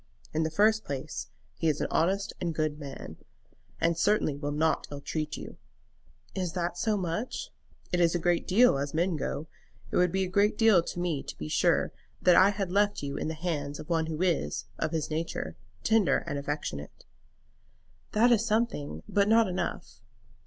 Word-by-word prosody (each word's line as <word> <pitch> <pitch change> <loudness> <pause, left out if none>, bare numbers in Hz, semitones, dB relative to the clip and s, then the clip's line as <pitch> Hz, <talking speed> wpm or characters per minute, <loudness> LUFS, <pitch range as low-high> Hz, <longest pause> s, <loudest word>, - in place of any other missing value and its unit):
In 155 - +1
the 160 - +1
first 215 +6 +3
place, 140 -5 -5 0.3
he 165 - +1
is 150 - 0
an - - 0
honest 195 +4 +1
and 170 -2 -1
good 155 -1 -1
man, 135 - -8 0.6
and 165 +1 +2
certainly 185 -4 +2
will 145 0 -4
not 155 +2 +1
ill 145 - -6
treat 155 +1 -3
you." - - -9 0.8
"Is 180 -3 -2
that 175 -1 -2
so 215 +3 +1
much?" 185 +6 -3 0.4
"It 180 - +1
is 170 0 +3
a - - +4
great 175 0 +1
deal, 215 - +5
as 145 +2 -3
men 175 +2 +1
go. 150 +1 -3 0.5
It - - 0
would 180 -1 +4
be 190 +1 +1
a - - -1
great 205 +3 +2
deal 220 -6 +6
to 175 - -6
me 170 -6 -1
to - - -8
be 75 - -5
sure - - +2 0.3
that 180 -1 +5
I 190 +3 +7
had 195 -3 -2
left 205 -3 +2
you 140 0 -3
in - - -2
the 160 - -3
hands 150 -4 -3
of - - -9
one 165 -1 +1
who 160 +2 -2
is, 160 - 0
of 160 - 0
his 160 -2 -2
nature, 160 +2 -3 0.3
tender 220 -4 +3
and 145 - -3
affectionate." 140 - -5 1.1
"That 235 +3 +5
is 225 -2 +4
something; 210 - -1
but 200 0 +2
not 225 0 +5
enough." 180 - -4
170 Hz, 190 wpm, -29 LUFS, 150-195 Hz, 1.1 s, I